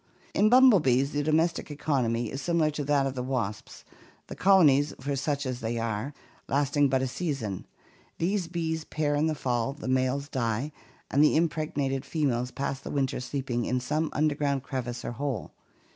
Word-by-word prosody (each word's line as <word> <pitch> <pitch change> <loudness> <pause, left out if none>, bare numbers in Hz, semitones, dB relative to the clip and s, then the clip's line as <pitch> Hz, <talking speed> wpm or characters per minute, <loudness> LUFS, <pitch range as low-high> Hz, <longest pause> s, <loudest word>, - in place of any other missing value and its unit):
In 215 - +4
bumblebees 170 - +5
the 145 - 0
domestic 160 +3 +1
economy 125 -6 -1
is 135 - -5
similar 165 -1 +1
to 150 0 -3
that 140 -1 +2
of 135 - -2
the 130 - -3
wasps, 125 -5 -4 0.4
the - - -8
colonies, 150 -7 +4
for 140 +2 -2
such 140 +1 -1
they 120 -3 -3
are, 115 +3 -2 0.4
lasting 145 0 +2
but 130 0 +1
a - - 0
season. 130 - -3 0.5
These 180 +1 0
bees 160 -2 -2
pair 150 -1 -1
in 150 +2 +2
the 155 - 0
fall, 125 -2 -1
the 150 - -8
males 130 +2 +1
die, 125 +1 -2 0.4
and 140 +3 +4
the 150 - +4
impregnated 150 -4 0
females 125 -6 -1
pass 135 +1 -3
the - - -8
winter 135 -2 -1
sleeping 125 -2 -2
in 125 +1 0
some 155 +5 -1
underground 145 -3 0
crevice 125 -3 -4
or - - -3
hole. 125 -3 -4
140 Hz, 170 wpm, -28 LUFS, 130-155 Hz, 0.5 s, bumblebees